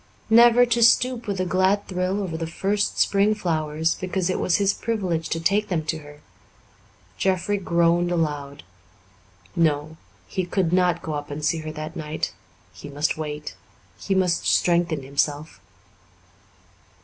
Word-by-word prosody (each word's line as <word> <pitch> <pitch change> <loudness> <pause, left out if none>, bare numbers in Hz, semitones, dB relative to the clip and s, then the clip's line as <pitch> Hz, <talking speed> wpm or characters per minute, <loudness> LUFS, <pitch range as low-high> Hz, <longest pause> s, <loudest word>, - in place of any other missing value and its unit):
Never 240 +1 +7
to 235 0 0
stoop 240 +1 +3
with 200 -2 -2
a 185 - 0
glad 190 +3 +1
thrill 185 +2 -1
over 170 -4 -4
the 165 0 -3
first 200 +5 -1
spring 205 +2 +3
flowers 160 -4 -1
because 185 0 -2
it - - -2
was 180 - +1
his 200 -1 +2
privilege 185 -8 -2
to 165 - -1
take 200 +6 +1
them 165 -4 -2
to 160 0 -2
her! 145 0 -14 1.0
Jeffrey 190 +2 0
groaned 170 -1 +2
aloud. 145 -4 -2 0.9
No, 155 -1 0 0.3
he 185 - -3
could 180 -1 -1
not 180 -2 +2
go 160 - -4
up 145 0 -4
to 145 +1 -6
see 165 +2 +1
her 155 0 -6
that 155 +1 -7
night; 155 -1 -4 0.4
he 145 - -10
must 145 +2 -1
wait 150 -1 -5 0.5
he 195 - -1
must 180 -2 +1
strengthen 170 -4 +2
himself. 145 +3 -2
170 Hz, 150 wpm, -23 LUFS, 155-195 Hz, 1.0 s, Never